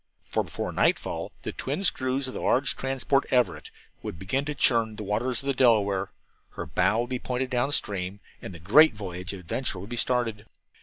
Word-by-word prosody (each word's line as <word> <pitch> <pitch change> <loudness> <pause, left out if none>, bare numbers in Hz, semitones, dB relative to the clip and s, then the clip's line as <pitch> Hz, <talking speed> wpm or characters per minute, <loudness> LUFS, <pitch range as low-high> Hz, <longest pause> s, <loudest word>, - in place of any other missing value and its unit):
For - - 0
before - - -4
nightfall - - 0
the - - -3
twin 195 - -3
screws 130 -5 +1
of 130 - -6
the - - -5
large 135 +2 +2
transport 135 +1 0
Everett 125 -2 +1 0.3
would - - -6
begin 130 +11 -1
to 150 0 -3
churn 115 -4 +2
the 105 - -6
waters 115 +5 0
of - - -11
the 140 - +1
Delaware, 100 -7 +3 0.4
her - - -5
bow 110 +2 +2
would 120 - -4
be 125 - -1
pointed 125 +1 -3
down 125 +3 +1
stream, 100 -7 0 0.2
and - - -7
the 85 - -9
great 115 - +6
voyage 90 -3 -5
of 100 - -7
adventure 100 +5 -2
would 100 +5 -9
be 120 - -3
started. 115 -3 0
120 Hz, 200 wpm, -27 LUFS, 100-130 Hz, 0.4 s, great